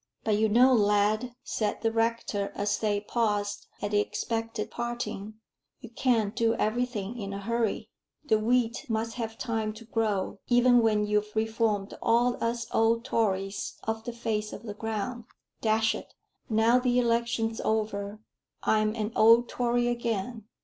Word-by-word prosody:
"But 215 -2 +2
you 220 0 +3
know, 250 +4 +6
lad," 215 +2 +2
said 215 -2 -2
the 225 - +2
rector, 225 -3 -1
as 205 0 0
they 205 -2 0
paused 205 -2 -1 0.2
at 205 - -1
the 205 - +3
expected 225 +1 -3
parting, 240 -3 -4 0.4
"you 240 - -11
can't 230 -4 +1
do 230 -1 +2
everything 235 -1 -2
in 200 -1 -5
a 200 - -4
hurry. 230 +1 -1 0.3
The 220 -7 +3
wheat 235 +1 +1
must 225 0 -1
have 225 0 -4
time 220 -3 -2
to 225 +2 -12
grow, 210 -3 -1
even 245 0 +5
when 215 -2 +2
you've 210 0 -1
reformed 220 -2 0
all 240 +2 +2
us 230 0 -1
old 230 +1 +2
Tories 195 -3 -1
off 220 0 -3
the 240 - -4
face 220 -2 -2
of - - -8
the 210 -3 -6
ground. 225 +2 -4 0.4
Dash 220 0 +2
it! - - -9 0.3
now 225 +2 +4
the 250 -1 +1
election's 235 -1 +1
over, 210 -1 -2 0.4
I'm 215 0 +2
an 215 -1 -2
old 230 +2 +6
Tory 240 0 +1
again. 235 -2 -2
225 Hz, 155 wpm, -28 LUFS, 210-235 Hz, 0.4 s, know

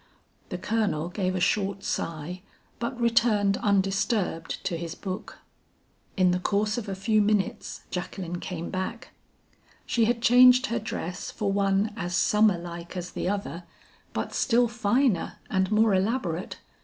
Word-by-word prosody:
The - - -3
Colonel 200 -8 -1
gave 185 0 -1
a - - 0
short 195 +1 0
sigh 165 +3 -3 0.4
but 240 +2 -3
returned 225 -4 +3
undisturbed 195 -3 0
to 170 - -1
his 165 -1 -5
book. 190 -1 -6 0.8
"In 185 -1 +4
the 180 - +1
course 210 +3 0
of 215 -3 -7
a 195 - -3
few 215 +3 +2
minutes 205 -1 -1
Jacqueline 175 -1 -4
came 175 -2 -5
back. 190 +5 -4 0.7
She 230 -2 +2
had 235 +1 +1
changed 250 +2 +7
her 235 -1 -1
dress 185 -3 -5
for 200 -2 -2
one 200 +1 +1
as 180 -4 -3
summerlike 175 -4 +1
as 180 0 -5
the - - -2
other, 195 -4 -4 0.5
but - - -3
still 240 0 +3
finer 235 0 +1
and 190 0 +1
more 215 0 +4
elaborate. 190 -3 -1
195 Hz, 145 wpm, -27 LUFS, 180-220 Hz, 0.8 s, changed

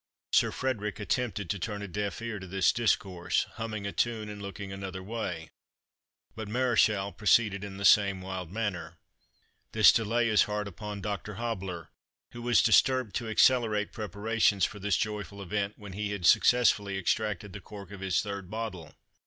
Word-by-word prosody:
Sir - - +4
Frederick 115 -6 -3
attempted 105 -1 -2
to 100 - -3
turn 105 +1 -4
a - - -5
deaf 100 +4 -4
ear 115 -3 -4
to 95 - -9
this 95 0 +3
discourse, 95 -6 0
humming 110 -3 -4
a 100 - -2
tune, 110 -1 -1
and 105 -1 -8
looking 100 0 -7
another 95 -1 -6
may, 95 -7 -5 0.8
but 110 -1 -6
Mareschal 110 -4 +2
proceeded 105 -1 +2
in 100 -1 -7
the 100 - -3
same 100 -2 +5
wild 95 -2 -6
manner. 90 -6 -3 0.8
"This 110 -3 +8
delay 115 +1 +1
is 110 -2 +4
hard 105 0 -3
upon 100 +2 -7
Dr. 105 +1 -4
Hobbler, 95 -7 -4 0.4
who 120 - -9
was 120 -1 +3
disturbed 125 0 +3
to 115 - -4
accelerate 110 -3 +3
preparations 105 -1 +1
for 105 - -6
this 100 -1 +1
joyful 105 -2 -4
event 100 +1 -2
when 100 -3 -10
he 105 +1 -3
had 95 -4 -4
successfully 105 -3 +4
extracted 105 +1 -1
the 100 - -8
cork 100 -2 -11
of 100 - -9
his 95 -2 0
third 100 -3 -6
bottle. 105 -7 -6
105 Hz, 170 wpm, -29 LUFS, 95-110 Hz, 0.8 s, This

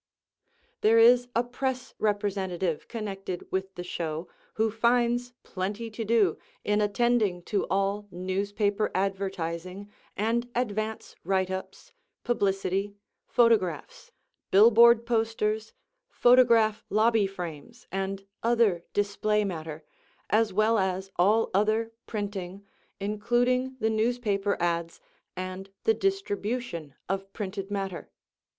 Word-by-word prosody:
There 225 +2 +5
is 245 +2 +6
a 235 - +3
press 255 +1 -3
representative 190 -5 -1
connected 195 -5 -5
with 190 0 -2
the 175 - -5
show 165 -2 -4 0.3
who 220 0 +1
finds 240 +2 +1
plenty 205 +5 -4
to 225 +2 -4
do 215 -6 +2 0.2
in 210 0 +1
attending 210 -4 +1
to 205 +2 -1
all 195 +1 0
newspaper 200 +3 -1
advertising 190 0 -3 0.3
and 235 +3 0
advance 220 -2 -2
writeups, 190 -1 -2 0.3
publicity, 195 -3 0 0.3
photographs, 235 - +1 0.4
billboard 235 +3 +7
posters, 220 -2 0 0.4
photograph 235 - +4
lobby 215 0 +3
frames 180 +4 -8
and 195 0 -3 0.2
other 225 -7 +2
display 205 +1 +1
matter, 160 -4 -5 0.5
as 220 -1 +3
well 215 +3 +3
as 190 0 -1
all 210 +6 +3
other 215 +3 +1 0.2
printing, 200 -2 -5 0.3
including 240 +5 0
the 220 0 +1
newspaper 215 -3 0
ads 170 -1 -1 0.4
and 185 +1 -5
the 225 - +4
distribution 225 - -2
of 195 +1 -3
printed 195 -1 -5
matter. 195 -3 -4
205 Hz, 105 wpm, -27 LUFS, 190-230 Hz, 0.5 s, billboard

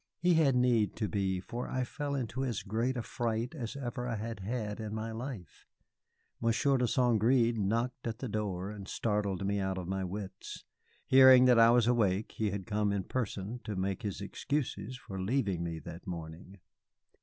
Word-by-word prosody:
He 175 +2 +3
had 150 -5 +4
need 120 -4 +3
to 110 - -1
be, 95 -1 -1
for 120 +6 -5
I 130 - -1
fell 145 +3 -3
into 130 0 -2
as 120 -8 -2
great 115 +6 -1
a 120 - -2
fright 115 +1 -2
as 125 -7 -5
ever 125 -2 -4
I 120 - -1
had 110 0 -5
had 105 +1 -3
in 110 -1 -4
my 110 +1 -3
life. 110 - -7 0.7
Monsieur 120 +4 +2
de 125 - +2
St. 120 -3 +2
Gré 120 0 +4
knocked 115 +5 -1
at 115 -1 -3
the 130 - -4
door 100 -3 -3
and 100 -2 -8
startled 100 -4 -1
me 100 +1 0
out 95 -1 -1
of 90 -2 -5
my 95 0 -2
wits. 95 +1 -6 0.4
Hearing 130 -1 +8
that 125 -2 +6
I 115 0 +8
was 120 -1 +5
awake, 110 -4 +2
he 110 -2 -1
had 100 -1 -4
come 105 -1 0
in 100 -1 -1
person 110 0 -3
to 105 - -4
make 95 +3 -2
his 100 -3 -4
excuses 130 +2 -3
for 95 -5 -7
leaving 100 -5 0
me 85 -1 -3
that 85 +3 -9
morning. 85 +2 -7
110 Hz, 190 wpm, -32 LUFS, 95-125 Hz, 0.7 s, Hearing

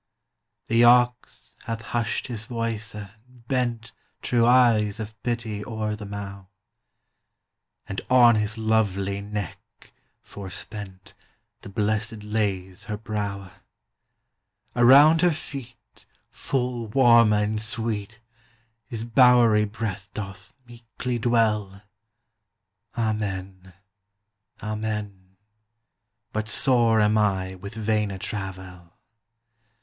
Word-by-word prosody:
The 115 +1 +3
Ox 125 0 +3
hath 115 -1 -4
husht 115 -2 -1
his 115 -3 -6
voyce 115 -3 -4
and 100 -2 -8 0.4
bent 120 -3 -1 0.3
Trewe 120 -1 +2
eyes 115 -4 +4
of 110 0 -6
Pitty 115 -4 -3
ore 110 -1 -3
the 105 -1 -8
Mow, 100 -1 -7 1.4
And 95 - -4
on 120 -2 +7
his 105 0 0
lovelie 100 -3 0
Neck, 105 -3 -8 0.3
forspent, 95 -1 -8 0.5
The - - -10
Blessed 105 +2 -2
lays 100 -4 -2
her 105 - -4
Browe. 100 -3 -4 1.2
Around 140 +7 +7
her 180 - +5
feet 135 -6 -9 0.2
Full 125 -3 -2
Warme 115 -2 +5
and 105 +1 0
Sweete 110 -1 -2 0.7
His 115 -2 -4
bowerie 120 -3 +5
Breath 105 -3 -5
doth 95 -3 -8
meeklie 120 +1 -5
dwell; 105 -4 +1 1.1
Amen, 100 -4 -3 0.9
Amen: 105 -3 -5 1.0
But 110 0 -2
sore 115 -2 +3
am 105 +1 +3
I 95 -3 0
with 100 +3 -9
Vaine 105 -1 0
Travèl! 95 -3 -7
110 Hz, 95 wpm, -25 LUFS, 100-115 Hz, 1.4 s, on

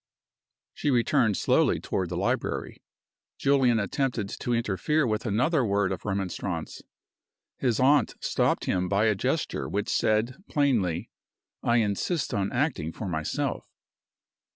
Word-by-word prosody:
She - - -1
returned 120 -3 +2
slowly - - +2
toward 95 -2 -2
the 90 - -3
library. 95 - -2 0.6
Julian 130 -4 +3
attempted 110 0 -1
to 120 - -4
interfere 120 - +1
with 110 0 -1
another 130 - +2
word 100 -3 +1
of - - -5
remonstrance. 95 -3 -3 0.8
His 120 -5 +1
aunt 135 -1 +4
stopped - - 0
him 90 0 0
by 100 +2 +2
a 110 - +4
gesture 95 - -2
which - - -2
said, 115 - +1
plainly, 110 - +1 0.5
"I 120 - +2
insist 115 - 0
on 100 -1 0
acting 120 - -1
for 105 - -6
myself." 80 -3 -2
110 Hz, 130 wpm, -27 LUFS, 100-130 Hz, 0.8 s, aunt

